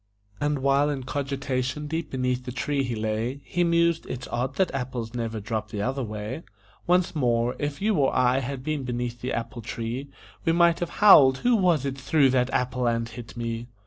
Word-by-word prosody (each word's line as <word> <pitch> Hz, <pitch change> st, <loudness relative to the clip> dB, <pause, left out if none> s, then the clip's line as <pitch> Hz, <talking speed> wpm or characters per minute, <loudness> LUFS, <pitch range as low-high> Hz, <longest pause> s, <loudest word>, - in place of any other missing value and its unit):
And 145 Hz, -2 st, -1 dB
while 140 Hz, +1 st, +3 dB
in 140 Hz, -3 st, -3 dB
cogitation 135 Hz, 0 st, -2 dB
deep 160 Hz, +3 st, -3 dB
beneath 125 Hz, -1 st, -1 dB
the 125 Hz, -, -4 dB
tree 140 Hz, +3 st, -1 dB
he 125 Hz, -3 st, -2 dB
lay, 110 Hz, +5 st, -2 dB
He 175 Hz, -, 0 dB
mused: 170 Hz, -1 st, +2 dB
"It's 125 Hz, 0 st, -5 dB
odd 125 Hz, +2 st, -2 dB
that 190 Hz, -, +1 dB
apples 125 Hz, -4 st, -4 dB
never 115 Hz, -2 st, -3 dB
drop 105 Hz, +1 st, -3 dB
the 105 Hz, -2 st, -3 dB
other 135 Hz, +3 st, -1 dB
way." 110 Hz, +6 st, -5 dB, 0.5 s
Once 180 Hz, -1 st, +2 dB
more: 120 Hz, -3 st, +1 dB
If 145 Hz, +4 st, -3 dB
you 215 Hz, +1 st, +3 dB
or 135 Hz, -2 st, +3 dB
I 130 Hz, +1 st, +3 dB
had 135 Hz, 0 st, -5 dB
been 155 Hz, -1 st, -2 dB
beneath 120 Hz, -1 st, -3 dB
the 125 Hz, -, -3 dB
apple 115 Hz, +1 st, -4 dB
tree, 120 Hz, +4 st, -5 dB, 0.3 s
We 165 Hz, -, +2 dB
might 170 Hz, 0 st, +4 dB
have 175 Hz, -, -2 dB, 0.2 s
howled: 135 Hz, -9 st, +8 dB
"Who 245 Hz, -1 st, +5 dB
was 175 Hz, -, +2 dB
it 135 Hz, 0 st, -3 dB
threw 135 Hz, 0 st, +3 dB
that 125 Hz, -1 st, +2 dB
apple 125 Hz, -1 st, 0 dB
and 115 Hz, 0 st, 0 dB
hit 120 Hz, +1 st, -10 dB
me?" 115 Hz, 0 st, -4 dB
130 Hz, 200 wpm, -26 LUFS, 120-145 Hz, 0.5 s, howled